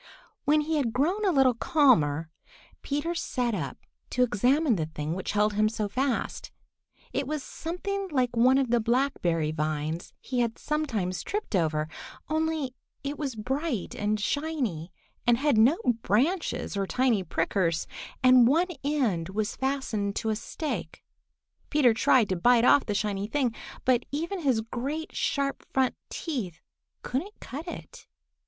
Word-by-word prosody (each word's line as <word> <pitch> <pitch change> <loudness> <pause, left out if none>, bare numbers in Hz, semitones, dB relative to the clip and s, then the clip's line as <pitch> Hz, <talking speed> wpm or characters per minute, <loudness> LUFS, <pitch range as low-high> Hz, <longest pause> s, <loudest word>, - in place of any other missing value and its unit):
When 300 +1 +4
he 310 +1 -1
had 245 -6 0
grown 340 - +1
a 390 - +3
little 270 -5 +4
calmer, 165 - +3 0.5
Peter 295 +4 -2
sat 250 -8 -1
up - - -3 0.3
to 250 - +2
examine 250 +4 +3
the 160 -4 -2
thing 155 0 -4
which 190 +3 -3
held 210 0 +2
him 215 +1 +3
so 215 -1 -2
fast. 255 +3 -2 0.6
It 275 -1 -1
was 300 -1 -3
something 390 +4 -4
like 255 -5 0
one 255 +3 +5
of 265 -4 +1
the 240 - +4
blackberry 220 - +1
vines 155 +1 -2
he 255 -2 -3
had 235 -2 0
sometimes 230 -13 -2
tripped 420 - -3
over, 155 -3 +1 0.4
only 315 -4 0 0.3
it 280 +1 -4
was 275 -5 -3
bright 260 - -2
and 210 +1 -1
shiny, 235 - -2 0.4
and 240 -1 +5
had 280 -3 +2
no 255 +9 +5 0.2
branches 250 - 0
or 195 -1 -1
tiny 250 -4 +2
prickers, 165 0 0 0.4
and 255 -2 +7
one 335 +8 +3
end 240 - 0
was 210 +2 -2
fastened 260 -7 -1
to 220 - -1
a 215 - +1
stake. 300 +7 -5 0.7
Peter 270 -6 +4
tried 225 0 +4
to 185 - +1
bite 240 +6 +4
off 280 - +5
the 205 - -1
shiny 200 -1 -1
thing, 250 0 0 0.3
but 255 -2 +3
even 335 +7 -2
his 265 -8 +2
great, 275 +8 -4
sharp 275 -1 -1
front 260 -1 +2 0.2
teeth 225 - -4 0.4
couldn't 345 +12 -3
cut 300 +7 -7
it. 165 - -9
250 Hz, 150 wpm, -28 LUFS, 205-290 Hz, 0.7 s, and